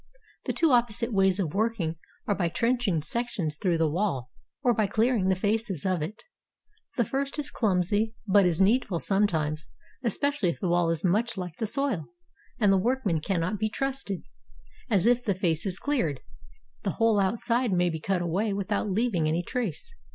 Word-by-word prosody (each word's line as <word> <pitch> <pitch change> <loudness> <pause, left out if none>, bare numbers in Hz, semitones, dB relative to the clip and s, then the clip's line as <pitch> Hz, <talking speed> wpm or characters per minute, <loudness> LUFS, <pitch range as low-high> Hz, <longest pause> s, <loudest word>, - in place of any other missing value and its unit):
The - - -1
two 325 -3 +3
opposite 235 -1 +2
ways 190 -2 +3
of 175 -7 -2
working 205 -6 0 0.3
are 205 - +1
by 180 -4 0
trenching 230 -5 0
sections 185 -5 -2
through 175 +1 0
the 165 -1 +2
wall, 150 -7 -1 0.3
or 245 - +4
by 215 -2 +1
clearing 220 -1 +2
the 190 - +3
faces 205 -3 -1
of 185 -3 +1
it. 215 +9 -5 0.7
The 240 - +3
first 275 +5 -2
is 290 -1 -3
clumsy, 205 +2 +1
but 200 -1 +5
is 165 -2 0
needful 200 -3 +3
sometimes, 160 -7 0 0.3
especially 265 -2 +1
if 170 - -4
the 185 - -1
wall 175 -1 +2
is 165 -2 -1
much 215 +5 +1
like 180 -4 -5
the 220 - -1
soil, 265 - -1 0.5
and 205 -4 +4
the - - +4
workmen 225 -6 +1
cannot 185 +3 -1
be 215 +1 0
trusted; 270 -7 -3 0.7
as, 200 -4 +3
if 245 +1 +3
the 200 -5 0
face 175 -1 0
is 185 -1 -1
cleared, 185 - -1 0.6
the - - -2
whole 225 -2 +3
outside 230 +4 +1
maybe 175 -3 +1
cut 180 +2 -1
away 195 +5 0
without 200 +1 -1
leaving 195 -5 +1
any 165 +3 0
trace. 245 - -3
200 Hz, 175 wpm, -27 LUFS, 175-230 Hz, 0.7 s, but